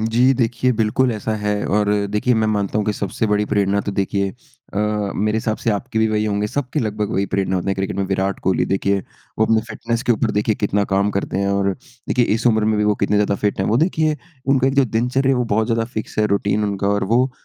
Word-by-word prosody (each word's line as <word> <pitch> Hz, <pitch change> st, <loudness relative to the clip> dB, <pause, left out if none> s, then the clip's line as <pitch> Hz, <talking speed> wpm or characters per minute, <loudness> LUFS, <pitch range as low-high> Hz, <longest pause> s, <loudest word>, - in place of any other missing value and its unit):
जी, 115 Hz, +4 st, +3 dB
देखिए 125 Hz, +1 st, +1 dB
बिल्कुल 115 Hz, +3 st, +1 dB
ऐसा 110 Hz, +1 st, -3 dB
है। 105 Hz, -1 st, -1 dB
और 105 Hz, 0 st, +1 dB, 0.2 s
देखिए 105 Hz, +4 st, +1 dB
मैं 110 Hz, -1 st, +1 dB
मानता 105 Hz, -1 st, 0 dB
हूँ 105 Hz, -, 0 dB
कि 105 Hz, -, +2 dB
सबसे 100 Hz, +2 st, -2 dB
बड़ी 105 Hz, 0 st, +1 dB
प्रेरणा 100 Hz, 0 st, +1 dB
तो 100 Hz, -, -4 dB
देखिए 100 Hz, 0 st, -1 dB, 0.4 s
अ, -, -, -1 dB, 0.4 s
मेरे 105 Hz, +2 st, 0 dB
हिसाब 110 Hz, -1 st, -1 dB
से 115 Hz, -, -1 dB
आपके 110 Hz, +3 st, -2 dB
भी 110 Hz, -, +3 dB
वही 105 Hz, 0 st, 0 dB
होंगे 105 Hz, 0 st, 0 dB
सबके 145 Hz, +5 st, -2 dB
लगभग 105 Hz, -2 st, -2 dB
वही 100 Hz, +1 st, 0 dB
प्रेरणा 95 Hz, -1 st, 0 dB
होते 90 Hz, -, -3 dB
हैं 95 Hz, -, +1 dB
क्रिकेट 95 Hz, 0 st, -2 dB
में 100 Hz, -, 0 dB
विराट 95 Hz, 0 st, -1 dB
कोहली। 95 Hz, -, +2 dB
देखिए 100 Hz, +1 st, +1 dB, 0.4 s
वो 110 Hz, -, +4 dB
अपने 110 Hz, 0 st, +3 dB
फ़िटनेस्स 115 Hz, 0 st, -3 dB
के 125 Hz, -3 st, +3 dB
ऊपर 110 Hz, 0 st, 0 dB
देखिए 105 Hz, +1 st, +1 dB
कितना 100 Hz, 0 st, 0 dB
काम 100 Hz, +1 st, +2 dB
करते 100 Hz, -1 st, -2 dB
हैं 100 Hz, 0 st, 0 dB
और 100 Hz, 0 st, +1 dB, 0.4 s
देखिए 125 Hz, -, +3 dB
इस 115 Hz, -, -1 dB
उम्र 110 Hz, -2 st, +3 dB
में 110 Hz, 0 st, +2 dB
भी 105 Hz, -, +2 dB
वो 105 Hz, 0 st, +3 dB
कितने 100 Hz, +1 st, +2 dB
ज़्यादा 105 Hz, -1 st, +2 dB
फ़िट 100 Hz, -1 st, -1 dB
हैं। 95 Hz, -, 0 dB
वो 110 Hz, -, +3 dB
देखिए 155 Hz, 0 st, +1 dB, 0.3 s
उनका 135 Hz, -1 st, +3 dB
एक 135 Hz, -, -1 dB
जो 140 Hz, -, +4 dB
दिनचर्या 125 Hz, +3 st, 0 dB
है -, -, +3 dB
वो 125 Hz, -, +1 dB
बहुत 110 Hz, +1 st, +2 dB
ज़्यादा 115 Hz, 0 st, 0 dB
फ़िक्स 110 Hz, 0 st, -5 dB
है 105 Hz, -, +4 dB
रूटीन 100 Hz, +1 st, 0 dB
उनका 100 Hz, -1 st, -2 dB
और 100 Hz, -1 st, +1 dB
वो 125 Hz, +2 st, +3 dB
105 Hz, 250 wpm, -20 LUFS, 100-115 Hz, 0.4 s, वो